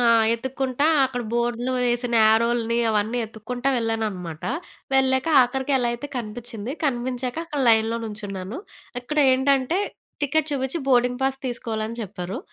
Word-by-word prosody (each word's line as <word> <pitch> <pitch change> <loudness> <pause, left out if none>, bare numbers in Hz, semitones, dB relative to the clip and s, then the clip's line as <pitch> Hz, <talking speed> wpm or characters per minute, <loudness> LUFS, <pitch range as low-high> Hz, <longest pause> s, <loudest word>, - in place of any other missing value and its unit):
ఆ! - - +2 0.3
యెతుక్కుంటా 260 +3 -2 0.2
అక్కడ 245 -2 -4
బోర్డులో 240 +1 0
వేసిన 240 0 0
యారోలని, 230 +1 +2
అవన్నీ 215 +3 0
యెతుక్కుంటా 235 +4 -4
వెళ్ళాననమాట. 210 -8 -3 0.5
వెళ్ళాక, 265 0 +3 0.2
ఆఖరికి 265 +3 -1
ఎలా 245 -1 +1
అయితే 240 +5 -5
కనిపిచ్చింది. 230 0 -5
కనిపించాక 250 -1 -1
అక్కడ 300 -4 -4
లైన్‌లో 225 0 +4
నుంచున్నాను. 205 - -5 0.4
అక్కడేంటంటే, 270 +2 +2 0.4
టికెట్ 305 +2 +1
చూపిచ్చి, 265 +3 -1
బోర్డింగ్ 250 0 +3
పాస్ 270 0 0
తీసుకోవాలని 230 -2 -3
చెప్పారు. 190 -2 -5
240 Hz, 120 wpm, -24 LUFS, 225-265 Hz, 0.5 s, లైన్‌లో